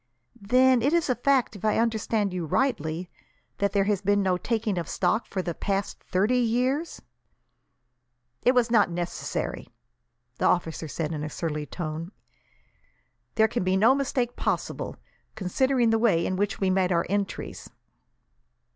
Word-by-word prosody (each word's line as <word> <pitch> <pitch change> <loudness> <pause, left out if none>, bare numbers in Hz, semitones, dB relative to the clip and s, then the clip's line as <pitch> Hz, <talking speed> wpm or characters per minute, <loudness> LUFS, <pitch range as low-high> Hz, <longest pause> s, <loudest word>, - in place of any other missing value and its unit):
"Then 255 +4 +4
it 280 +6 +2
is 335 -6 +2
a - - +1
fact, 260 -2 +1
if 200 - -11
I 215 - +2
understand 220 -3 0
you 175 -3 -3
rightly, 170 - -1 0.5
that 200 -1 +1
there 200 -1 +2
has 200 -1 0
been 205 0 +2
no 185 -1 +2
taking 220 0 -1
of 165 - -5
stock 220 - 0
for 190 -2 -3
the 175 - -3
past 195 +3 -3
thirty 205 +7 +1
years?" 255 +7 0 1.4
"It 250 - +4
was 240 -2 +3
not 210 -5 +4
necessary," 175 0 -4 0.7
the - - +3
officer 165 -2 0
said, 155 +1 -3
in 150 -2 -4
a 155 - -3
surly 150 -1 -4
tone. 165 +1 -5 1.2
"There 220 0 +5
can 235 -2 -2
be 185 +1 +2
no 225 +6 +6
mistake 255 -3 -1
possible, - - -2 0.4
considering 235 +5 +1
the 225 - +2
way 200 -8 +3
in 185 - -1
which 205 +2 -1
we 190 -1 +1
made 185 -1 +2
our 170 -1 +2
entries." 200 +1 -3
205 Hz, 155 wpm, -26 LUFS, 180-240 Hz, 1.4 s, no